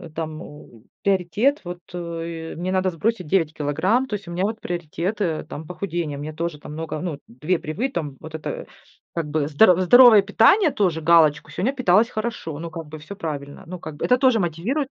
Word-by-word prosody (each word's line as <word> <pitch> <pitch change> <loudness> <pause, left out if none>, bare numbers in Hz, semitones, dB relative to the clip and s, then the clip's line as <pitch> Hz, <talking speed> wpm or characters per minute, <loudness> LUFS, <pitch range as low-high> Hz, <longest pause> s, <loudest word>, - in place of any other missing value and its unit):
там 155 -1 -4
у 120 -6 -13 0.2
приоритет, 200 - +1
вот, 175 0 -6 0.2
э, 165 -1 -5
мне 180 +3 -3
надо 185 0 +1
сбросить 185 +1 -2
9 160 -2 +1
килограмм. 160 - +1
То 210 - -2
есть 200 -3 -8
у - - -7
меня 175 +2 -1
вот 220 +2 -1
приоритет, 175 +4 -3
э, 160 -6 -1
там 155 +1 -8
похудение. 170 -4 -4
Мне 150 +2 -6
тоже 165 -1 -4
там 150 - -9
много, 160 0 -4
ну, 160 -5 -4
2 150 +9 -1
привы 210 - -3
там 150 - -4
вот 160 0 -10
это 155 - -5 0.5
как 165 -3 -2
бы 145 -1 0
здоро 180 +4 +5
здоровое 220 +2 +8
питание 230 - +4
тоже 175 -8 0
галочку, 155 -2 +4
сегодня 190 - 0
питалась 230 -3 +3
хорошо, 215 -9 -4
ну, 165 +2 -6
как 165 -2 -7
бы 155 +1 -8
всё 155 +6 -9
правильно. 145 -7 -6
Ну, 180 0 -7
как 155 -2 -8
бы - - -2
это 250 - +4
тоже 255 -3 +4
мотивирует. 195 - -1
170 Hz, 200 wpm, -23 LUFS, 155-200 Hz, 0.5 s, здоровое